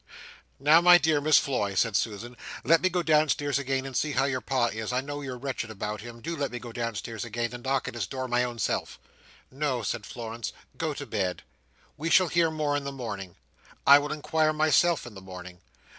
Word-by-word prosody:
"Now 150 +5 +6
my 175 0 +9
dear 155 -2 +2
Miss 155 0 +5
Floy," 105 -8 0
said 100 +3 +2
Susan, 115 +4 -2 0.3
"let 165 0 +4
me 185 - +3
go 180 -1 -1
downstairs 150 -3 +2
again 135 -1 -1
and 135 -1 -7
see 150 -1 0
how 135 - +2
your 130 -2 -1
Pa 130 -3 +1
is, 110 +1 -4
I 125 - +1
know 145 +2 -5
you're 130 -3 -5
wretched 130 -3 -4
about 105 -1 -4
him, 120 0 -10
do 170 +8 -4
let 145 -3 -2
me 125 - -4
go 120 -1 -8
downstairs 115 -1 -4
again 120 +1 -3
and 120 0 -8
knock 135 0 0
at - - -4
his 115 -5 -3
door 130 +5 -4
my 120 0 +2
own 120 -1 -4
self." 110 - -2 0.5
"No," 135 -3 -1
said 105 +1 -3
Florence, 115 -1 -6 0.2
"go 155 -3 -2
to 140 - -6
bed. 95 -7 -2 0.5
We 160 +3 -2
shall 185 0 +5
hear 170 0 +3
more 150 -2 -1
in 145 - -1
the 140 - -4
morning. 105 -9 -6 0.5
I 140 +1 +9
will 145 +1 -4
inquire 155 +1 +1
myself 155 +1 +3
in 120 - -9
the 95 - -10
morning. 90 -1 -10
130 Hz, 220 wpm, -27 LUFS, 115-150 Hz, 0.5 s, my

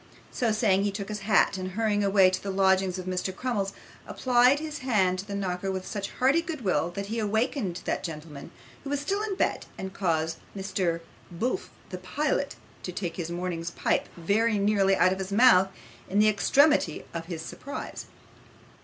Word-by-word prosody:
So 235 -3 0
saying, 205 -3 +2
he 205 - +1
took 195 0 -5
his 210 0 -3
hat, 200 -1 +3
and 185 0 -5
hurrying 210 -1 +1
away 195 -2 +5
to 185 - -2
the 200 - -5
lodgings 190 -1 +2
of 185 - -6
Mr 185 0 -2
Crummles, 205 -5 -1 0.4
applied 250 +2 +4
his 305 -1 -5
hand 195 -9 +1
to 195 - -6
the 200 - -4
knocker 190 -1 -2
with 190 -1 -4
such 200 -2 -4
hearty 270 +6 +3
good 325 -4 -5
will, 170 -6 +1
that 200 +3 -5
he 225 +3 -3
awakened 220 - -1
that - - -1
gentleman, 150 -3 -7 0.3
who 275 - -6
was 285 0 0
still 390 +8 -1
in 425 -2 -2
bed, - - -1
and 190 0 -6
caused 165 -5 0 0.2
Mr 185 -4 -1 0.3
Bulph 225 +9 -2 0.2
the 185 - -6
pilot 280 +8 -1 0.3
to 180 - -5
take 175 -1 -4
his 170 -2 -3
morning's 170 -1 -3
pipe - - 0
very 210 +6 +2
nearly 200 -1 +3
out 185 0 +4
of 190 - -6
his 190 0 -4
mouth 200 -4 +6 0.4
in 195 - -1
the 210 +1 +6
extremity 275 - +3
of 165 -1 -4
his 165 -3 -5
surprise. 280 +11 -7
195 Hz, 190 wpm, -27 LUFS, 185-225 Hz, 0.4 s, mouth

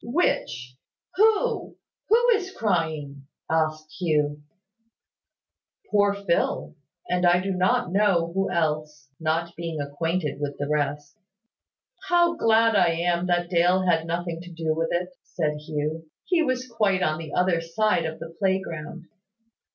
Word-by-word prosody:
"Which? 130 - -1 0.4
Who? 445 +3 +2 0.3
Who 475 +3 +4
is 390 -3 -2
crying?" 155 -8 -2 0.2
asked 155 -1 -1
Hugh. 150 -4 0 1.5
"Poor 205 -1 +3
Phil, 200 -4 -1 0.3
and 180 0 0
I 175 0 +5
do 195 +2 -2
not 180 -1 +1
know 190 -4 +2
who 195 +1 0
else, 150 -4 -2
not 165 +1 -1
being 165 -2 -4
acquainted 150 +2 -2
with 145 -1 -3
the 145 - -3
rest." 145 +1 -2 0.9
"How 345 -1 +4
glad 225 -5 +3
I 175 -4 +4
am 170 +1 0
that 175 0 0
Dale 180 +2 +3
had 165 -2 +2
nothing 170 0 -3
to 175 0 -11
do 165 -1 -1
with 165 +1 -1
it!" 180 +1 -1
said 150 -3 -2
Hugh. 155 +1 -4 0.2
"He 350 -2 +2
was 255 -4 -1
quite 210 -6 +1
on 155 -2 0
the 160 -2 -7
other 180 -2 +2
side 175 +1 +1
of 160 0 -4
the 165 0 -9
playground." 175 -4 -2
170 Hz, 140 wpm, -25 LUFS, 155-195 Hz, 1.5 s, I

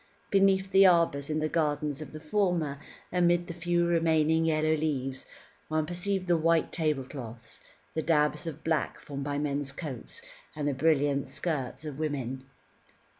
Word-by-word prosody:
Beneath 195 -1 +3
the 195 0 +7
arbours 165 -5 +3
in 155 - 0
the 155 0 0
gardens 150 -2 -1
of 155 - -8
the 155 - -8
former, 160 -4 0 0.3
amid 175 -1 +3
the 170 - -6
few 175 0 +1
remaining 160 -1 +3
yellow 155 0 +2
leaves, 135 -4 -2 0.4
one 155 0 0
perceived 185 +3 -1
the 175 -1 +3
white 165 0 +2
tablecloths, 130 -7 -3 0.3
the 160 - -1
dabs 150 0 +1
of 160 -1 -6
black 160 -1 0
formed 140 -1 -6
by 145 0 -2
men's 145 -1 -2
coats, 150 - -7 0.3
and 145 -1 -2
the 145 - +1
brilliant 145 -1 +2
skirts 155 -3 -3
of 150 -2 -6
women. 135 -4 -3
155 Hz, 155 wpm, -29 LUFS, 145-170 Hz, 0.4 s, the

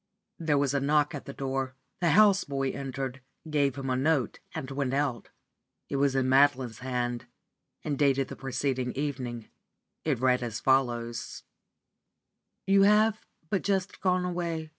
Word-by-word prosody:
There 155 -3 +1
was 140 -1 +1
a 140 - +2
knock 145 +1 +2
at 145 - -6
the - - -6
door. 135 -1 -3 0.2
The 175 - +2
house 205 -2 +6
boy 135 -1 -2
entered, 135 -1 -5 0.3
gave 145 -3 +1
him 135 -2 -3
a - - +2
note, 135 0 +1 0.2
and 140 -4 -5
went 135 -1 -1
out. 140 -4 -1 0.6
It 140 - -1
was 140 -1 +2
in 130 -1 +2
Madeline's 130 -3 +3
hand, 125 -2 -3 0.6
and 145 -3 -2
dated 135 -2 +3
the - - -8
preceding 130 -1 -2
evening. 130 -5 -4 0.5
It 150 -5 +1
read 125 0 +3
as 115 -2 -3
follows: 120 -3 0 1.2
"You 195 +1 +5
have 210 +2 +4 0.3
but 195 - +1
just 195 -2 -1
gone 180 -1 +2
away. 170 -3 -3
135 Hz, 155 wpm, -28 LUFS, 130-155 Hz, 1.2 s, house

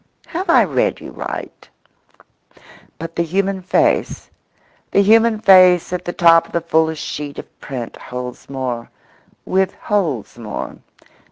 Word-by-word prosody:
Have 360 +2 -5
I 335 - +6
read - - 0
you - - -10
right? - - -7 1.3
But 165 0 -7
the - - 0
human 190 +3 -1
face—the 185 +2 -2
human 225 +1 +4
face 185 -4 +6
at 180 0 -4
the 175 - -2
top 165 -1 +5
of - - -20
the 170 - 0
fullest 160 -1 0
sheet 145 -1 -6
of - - -11
print 125 -4 -6
holds 125 0 -8
more, 130 -3 -4 0.6
withholds 185 - -1
more. 105 -3 -6
170 Hz, 125 wpm, -19 LUFS, 140-190 Hz, 1.3 s, I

